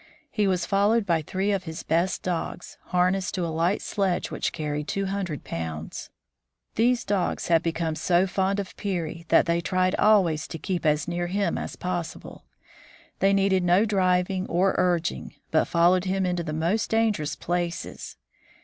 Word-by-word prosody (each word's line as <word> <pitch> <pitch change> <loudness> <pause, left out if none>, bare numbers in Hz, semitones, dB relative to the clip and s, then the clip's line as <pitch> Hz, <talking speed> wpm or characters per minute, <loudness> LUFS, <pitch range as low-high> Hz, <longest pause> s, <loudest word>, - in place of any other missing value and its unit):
He 210 -2 +1
was 185 -2 +1
followed 205 +3 +2
by 170 -4 +2
three 190 +6 -1
of 195 -2 -1
his 160 -1 -6
best 170 +4 0
dogs, 175 0 -4
harnessed 180 0 +1
to 180 -2 -1
a 165 - -3
light 170 +5 +1
sledge 195 -3 -1
which - - -2
carried 150 -1 -3
two 195 0 -1
hundred 190 -6 -3
pounds. 80 -1 -5 0.6
These 240 +2 +2
dogs 195 -3 -1
had 165 -1 +5
become 165 -1 -1
so 175 +3 +2
fond 195 +1 0
of 195 -2 -5
Peary 170 -4 -4
that - - +5
they 170 0 +1
tried 185 +1 +1
always 185 -8 +3
to - - -6
keep 175 0 -2
as 150 +1 +1
near 175 0 -2
him 200 +3 0
as - - -5
possible. 175 -2 -5 0.7
They 195 - +4
needed 195 -2 +2
no 180 +4 +4
driving 185 -2 +1
or 185 +2 +2
urging, 175 - 0 0.2
but - - +3
followed 175 +2 +3
him 190 0 0
into 180 -1 -1
the 155 -2 -4
most 170 +8 0
dangerous 220 -9 +1
places. 175 - -4
180 Hz, 165 wpm, -25 LUFS, 170-195 Hz, 0.7 s, had